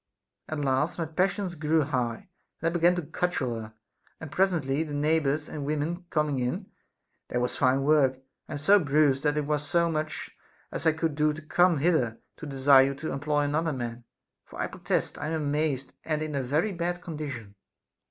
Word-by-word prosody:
At 155 - -3
last 140 +4 +1
my 165 - -1
passion 185 +5 0
grew 155 0 +2
high, 125 -5 -2 0.3
and 165 - -1
I 165 - 0
began 175 +1 +4
to 175 - -2
cudgel 145 -5 -1
her, 110 -1 -7 0.5
and 160 -3 -8
presently 160 -7 +1
the 150 -2 -3
neighbors 150 0 +1
and 150 - -5
women 155 +5 -2
coming 150 -3 0
in, 125 0 -3 0.6
there 125 - -1
was 125 0 -1
fine 130 +1 +2
work; 140 -3 +4 0.3
I - - -5
am - - -2
so 195 +8 +5
bruised 145 -3 +3
that 150 0 +1
it 150 - 0
was 150 0 0
as 170 -1 +4
much 155 0 -4 0.4
as 160 - -2
I 160 - +5
could 160 0 -1
do 150 +1 +2
to 155 - -8
come 175 +2 +3
hither 140 -7 +2 0.2
to 155 - -7
desire 135 -1 +6
you 140 - -3
to 155 +3 -4
employ 145 +1 0
another 155 +2 0
man, 120 -2 -5 0.4
for - - -12
I - - +1
protest - - -2
Τ - - -8
am 155 - -2
amazed 145 -3 -1
and 155 -1 -1
in 155 -1 -4
a 140 - 0
very 150 +11 0
bad 175 0 -3
condition. 135 - -6
150 Hz, 195 wpm, -28 LUFS, 135-160 Hz, 0.6 s, desire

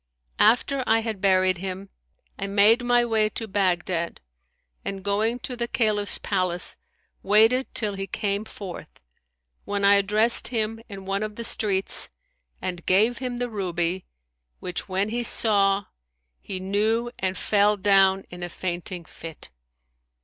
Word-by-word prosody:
After 250 +4 +3
I 225 0 +3
had 220 -4 -4
buried 185 -2 +3
him, 190 +1 -6 0.5
I 195 - -3
made 210 +5 +4
my 245 0 +3
way 220 -2 +1
to 225 +1 -5
Baghdad 180 -3 -1 0.6
and, 195 -1 -5
going 215 +4 0
to 250 - -5
the 235 -1 -3
Caliph's 215 -5 +1
palace, 185 -3 0 0.5
waited 225 +6 +3
till 210 -4 -1
he 195 0 -5
came 200 +2 -2
forth, 195 -4 -9 0.8
when 200 0 -1
I 200 - +7
addressed 210 +4 +3
him 225 -1 -2
in 195 -2 -9
one 195 +1 -2
of 215 -1 -4
the 235 - -6
streets 195 -4 +2 0.5
and 180 -2 -5
gave 220 +6 +3
him 250 -2 -4
the 245 0 -2
ruby, 180 -4 -2 0.5
which 180 +2 -5
when 190 +3 -1
he 240 +2 -2
saw, 200 -4 +3 0.6
he 190 - -5
knew 215 +5 0
and 185 0 -2
fell 210 0 +2
down 195 -1 +3
in 175 0 -9
a 175 - -4
fainting 175 0 -5
fit. 160 0 -11
200 Hz, 145 wpm, -24 LUFS, 190-225 Hz, 0.8 s, I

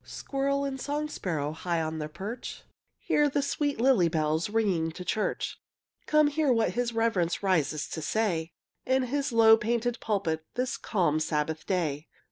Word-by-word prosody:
Squirrel 280 0 -2
and 265 -1 -4
song 295 +1 -2
sparrow, 155 - -2
High 170 +2 -2
on 160 0 -2
their 150 0 -4
perch, 210 +9 -7 0.3
Hear 295 -1 +2
the 280 0 0
sweet 285 -1 -1
lily 235 -9 +4
bells 160 +2 0
Ringing 195 -7 +1
to 180 - -8
church. 215 - -2 0.5
Come, 305 0 +5
hear 290 -1 +2
what 230 -2 +2
his 240 0 -1
reverence 215 -7 0
Rises 155 -6 +1
to 160 - -5
say, 170 -3 0 0.3
In 260 0 +2
his 275 +2 -1
low 225 -1 +7
painted 235 +2 -1
pulpit 190 -7 -1
This 250 0 -1
calm 170 -7 +1
Sabbath 155 0 -2
day. 160 -5 -1
210 Hz, 160 wpm, -28 LUFS, 160-255 Hz, 0.5 s, low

